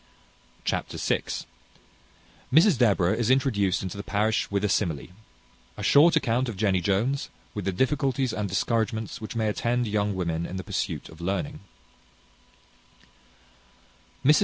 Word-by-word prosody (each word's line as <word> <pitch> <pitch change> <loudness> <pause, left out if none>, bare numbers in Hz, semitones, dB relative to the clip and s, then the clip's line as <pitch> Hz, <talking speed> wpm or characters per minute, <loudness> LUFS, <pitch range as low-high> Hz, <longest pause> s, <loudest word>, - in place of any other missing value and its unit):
Chapter - - -2
vi. - - +1 1.3
Mrs 160 - +5
Deborah 95 -6 +3
is 115 +1 0
introduced 120 -10 +2
into 95 +1 -5
the 100 - -5
parish 105 +2 0
with 100 0 -1
a - - +3
simile. 85 -8 -1 0.7
A - - -6
short 160 +4 +6
account 125 -4 +1
of 110 - -6
Jenny 95 -3 +2
Jones, 110 - 0 0.2
with 105 -3 -4
the 95 - +1
difficulties 130 +3 0
and 105 -2 -2
discouragements 110 +3 -1
which 110 - -6
may 110 -1 0
attend 120 +3 0
young 105 -1 0
women 85 -2 -2
in 90 - -7
the 95 - -4
pursuit - - -3
of 80 +2 -13
learning. 100 - -2
110 Hz, 135 wpm, -26 LUFS, 95-125 Hz, 1.3 s, short